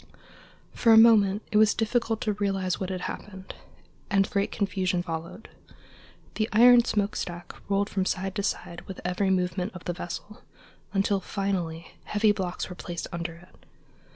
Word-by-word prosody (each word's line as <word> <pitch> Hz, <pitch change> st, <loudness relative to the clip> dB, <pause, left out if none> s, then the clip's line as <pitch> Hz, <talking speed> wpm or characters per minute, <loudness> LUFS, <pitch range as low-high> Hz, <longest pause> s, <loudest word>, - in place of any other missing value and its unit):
For 230 Hz, -, +3 dB
a 220 Hz, -, +8 dB
moment 215 Hz, -3 st, +6 dB
it 210 Hz, -, +3 dB
was 215 Hz, -1 st, +5 dB
difficult 225 Hz, 0 st, 0 dB
to 210 Hz, -, 0 dB
realize 195 Hz, -3 st, -1 dB
what 190 Hz, -, -3 dB
had 185 Hz, -1 st, -4 dB
happened, 190 Hz, 0 st, -7 dB, 0.6 s
and 195 Hz, -1 st, +3 dB
great 200 Hz, 0 st, 0 dB
confusion 190 Hz, -3 st, -1 dB
followed. 170 Hz, +4 st, -6 dB, 0.9 s
The 215 Hz, 0 st, -1 dB
iron 240 Hz, +2 st, +7 dB
smokestack 195 Hz, -5 st, -2 dB, 0.2 s
rolled 200 Hz, 0 st, +1 dB
from 190 Hz, -3 st, -1 dB
side 190 Hz, 0 st, -2 dB
to 200 Hz, -, -2 dB
side 175 Hz, -3 st, -3 dB
with 190 Hz, -, -8 dB
every 180 Hz, +2 st, 0 dB
movement 185 Hz, +1 st, 0 dB
of 180 Hz, -, -9 dB
the 175 Hz, -, -2 dB
vessel, 190 Hz, +6 st, -7 dB, 0.5 s
until 200 Hz, 0 st, +1 dB
finally 180 Hz, -4 st, -3 dB
heavy 210 Hz, 0 st, +3 dB
blocks 185 Hz, -3 st, -3 dB
were 180 Hz, -, -8 dB
placed 175 Hz, -1 st, -6 dB
under 170 Hz, -1 st, -4 dB
it. 175 Hz, +2 st, -19 dB
195 Hz, 155 wpm, -27 LUFS, 180-210 Hz, 0.9 s, a